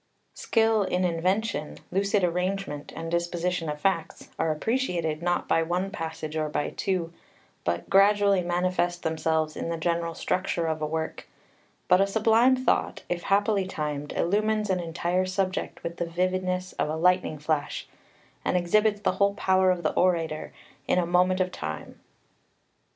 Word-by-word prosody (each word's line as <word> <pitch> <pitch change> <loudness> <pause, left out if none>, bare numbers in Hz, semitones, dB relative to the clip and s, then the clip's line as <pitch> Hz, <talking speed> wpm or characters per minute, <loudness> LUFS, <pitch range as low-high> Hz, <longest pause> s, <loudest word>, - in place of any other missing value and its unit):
Skill 225 -1 +2
in 185 -1 0
invention, 180 +1 -1
lucid 200 +1 +1
arrangement 180 -3 -2
and 165 0 -5
disposition 170 -1 -1
of 150 0 -4
facts, 170 -1 -1
are 160 -1 +2
appreciated 170 -4 -1
not 175 0 0
by 165 - +3
one 180 +4 -1
passage, 160 -4 -5
or 155 -1 -1
by 145 - -2
two, 180 -4 -2 0.5
but 85 0 -2
gradually 200 -1 +4
manifest 175 0 0
themselves 160 -1 0
in - - -4
the 165 - -2
general 170 0 -1
structure 180 -2 -1
of 160 -1 -2
a 155 - 0
work; 160 +1 -4 0.6
but 180 +1 +5
a 195 - +3
sublime 225 +5 +4
thought, 255 -1 0
if 175 -1 -1
happily 200 0 +2
timed, 150 -4 -4
illumines 210 +3 +1
an 185 - +1
entire 175 +2 -1
subject 185 0 -2
with 170 0 -5
the 170 - -1
vividness 185 +1 -1
of - - +1
a 155 - -1
lightning 180 -1 +2
flash, 150 0 -2 0.6
and - - +1
exhibits 205 +4 +2
the - - +2
whole 200 0 +1
power 190 -2 +3
of 180 -1 0
the 155 - +1
orator 165 -4 0 0.4
in - - +2
a 180 - +2
moment 180 +2 +3
of 185 0 +1
time. - - -6
180 Hz, 155 wpm, -27 LUFS, 165-195 Hz, 0.6 s, but